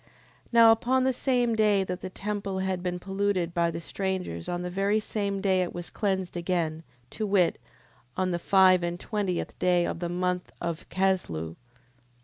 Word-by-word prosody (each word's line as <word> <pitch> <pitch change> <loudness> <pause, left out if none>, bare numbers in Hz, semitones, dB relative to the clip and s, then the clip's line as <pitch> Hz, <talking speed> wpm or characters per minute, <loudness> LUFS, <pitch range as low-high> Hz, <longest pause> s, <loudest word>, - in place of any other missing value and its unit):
10:5. - - -31 0.4
Now 230 -1 +8
upon 250 +3 +2
the 260 0 +2
same 245 -2 +1
day 210 -3 +3
that 180 -1 -5
the - - -5
temple 200 0 -4
had 190 -1 -1
been 180 0 -2
polluted 190 -2 -1
by 170 -1 +2
the 165 - -4
strangers 180 - -3
on 175 0 -2
the 180 - -3
very 200 +3 +1
same 200 -2 -2
day 190 -2 +2
it 180 - -3
was 175 0 -6
cleansed 190 -4 -1
again; 170 -3 -1 0.3
to 215 -1 -3
wit, 190 -4 +2 0.6
on 185 -1 +1
the 175 - -1
five 185 0 +5
and 175 0 -3
twentieth 200 -4 -3
day 180 -1 +3
of - - -3
the 175 -1 -3
month 180 0 -1
of 170 -1 -4
Casleu. 135 - -1
185 Hz, 180 wpm, -27 LUFS, 175-200 Hz, 0.6 s, Now